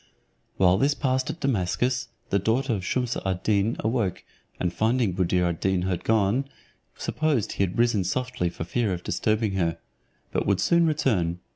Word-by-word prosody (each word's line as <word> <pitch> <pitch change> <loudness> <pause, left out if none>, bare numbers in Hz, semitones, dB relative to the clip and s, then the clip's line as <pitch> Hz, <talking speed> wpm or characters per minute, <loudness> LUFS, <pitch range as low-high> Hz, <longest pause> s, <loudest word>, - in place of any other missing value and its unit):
While 90 0 +4
this 145 +3 +2
passed 130 -2 0
at 165 - -5
Damascus, 125 +1 0 0.2
the 100 - +3
daughter 120 +6 +1
of 95 -4 -3
Shumse 125 +4 -1
ad 95 -1 -2
Deen 105 +2 +2
awoke, 110 -5 -1 0.4
and 90 -1 -1
finding 115 -3 +1
Buddir 90 0 +1
ad 85 -2 -1
Deen 95 -2 +1 0.2
gone, 110 +4 +2 0.5
supposed 150 -8 0
he - - 0
had 95 -1 -2
risen 115 -4 +3
softly 125 -1 -1
for 85 - -6
fear 105 +3 0
of 90 0 -5
disturbing 110 -1 0
her, 85 -4 0 0.5
but - - -1
would 100 -2 +2
soon 170 - +3
return. 100 - +1
110 Hz, 165 wpm, -26 LUFS, 90-125 Hz, 0.5 s, While